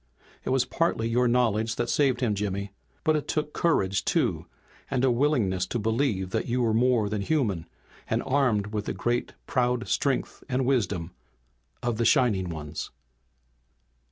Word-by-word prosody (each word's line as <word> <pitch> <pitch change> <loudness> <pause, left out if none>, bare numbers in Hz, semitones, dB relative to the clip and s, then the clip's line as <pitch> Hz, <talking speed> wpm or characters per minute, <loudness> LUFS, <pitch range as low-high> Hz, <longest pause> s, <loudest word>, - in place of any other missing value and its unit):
"It - - -3
was 130 -1 +2
partly 130 -5 0
your 120 +2 +2
knowledge 115 -2 +2
that 120 - -1
saved 130 -1 +2
him, 115 -4 +2
Jimmy. 100 -1 -3 0.3
But 155 -2 +3
it 150 - -2
took 150 -1 -2
courage 100 - +1
too, - - 0 0.4
and 130 -2 0
a 130 - +4
willingness 120 -9 +1
to 120 - -2
believe 110 -4 0
that - - -1
you 125 +1 +1
were 115 -2 +2
more 120 -2 +3
than 105 0 -2
human, 100 - 0 0.4
and - - 0
armed 115 -7 +1
with 105 -1 -2
the - - -2
great 120 0 -1
proud 125 -2 0
strength 135 -2 -1
and 130 0 0
wisdom 100 -10 0 0.7
of 120 -2 0
the 115 - +1
Shining 115 - +3
Ones." 80 -2 -5
120 Hz, 160 wpm, -27 LUFS, 100-130 Hz, 0.7 s, a